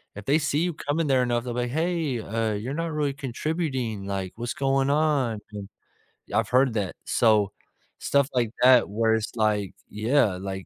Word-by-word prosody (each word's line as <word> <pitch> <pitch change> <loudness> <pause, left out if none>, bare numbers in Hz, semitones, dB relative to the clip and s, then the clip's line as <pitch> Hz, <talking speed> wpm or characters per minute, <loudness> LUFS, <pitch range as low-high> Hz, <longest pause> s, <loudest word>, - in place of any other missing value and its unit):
If 100 0 -9
they 145 +6 +3
see 145 -1 0
you 175 0 -1
coming 150 +2 -1
there 130 -2 +3
enough, 120 -1 0
they'll 120 -1 -4
be 125 - 0
like, 120 0 -3
"Hey, 160 -4 -1
uh, 110 +1 -1
you're 115 +7 -4
not 165 0 -2
really 150 -2 0
contributing, 130 - -3
like, 95 -2 -4
what's 120 +1 -4
going 135 0 +1
on 145 -7 +1
an" 100 -2 -6 0.7
I've - - +1
heard 130 -1 +3
that, 100 -5 -2
so, 105 -4 +3 0.5
stuff 140 -1 +2
like 120 -4 +1
that 125 -3 +6
where 110 +2 +2
it's 110 -1 -3
like, 105 -3 +1 0.2
yeah, 110 -1 +2
like, 95 -1 -5
125 Hz, 185 wpm, -25 LUFS, 110-140 Hz, 0.7 s, that